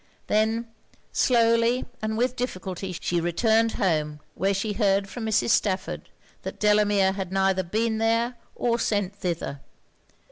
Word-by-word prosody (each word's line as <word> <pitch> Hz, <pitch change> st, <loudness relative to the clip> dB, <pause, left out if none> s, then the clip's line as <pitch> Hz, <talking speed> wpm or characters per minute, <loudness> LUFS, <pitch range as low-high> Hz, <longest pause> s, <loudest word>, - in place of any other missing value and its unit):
Then, 220 Hz, +2 st, +1 dB, 0.5 s
slowly 230 Hz, 0 st, +3 dB, 0.2 s
and 220 Hz, 0 st, -2 dB
with 250 Hz, +2 st, +1 dB
difficulty, 185 Hz, -6 st, -4 dB
she 175 Hz, -1 st, 0 dB
returned 220 Hz, +6 st, +2 dB
home; 155 Hz, -5 st, 0 dB
where 195 Hz, +2 st, 0 dB
she 205 Hz, +2 st, -1 dB
heard 200 Hz, -2 st, +2 dB
from 225 Hz, +2 st, -5 dB
Mrs. 220 Hz, +1 st, +2 dB
Stafford 195 Hz, -4 st, 0 dB, 0.3 s
that -, -, -7 dB
Delamere 205 Hz, -2 st, +3 dB
had 190 Hz, -2 st, -5 dB
neither 190 Hz, 0 st, +2 dB
been 220 Hz, +5 st, -1 dB
there 230 Hz, +2 st, +1 dB, 0.2 s
or 235 Hz, -1 st, 0 dB
sent 205 Hz, -3 st, 0 dB
thither. 170 Hz, -7 st, -3 dB
210 Hz, 135 wpm, -25 LUFS, 190-230 Hz, 0.5 s, slowly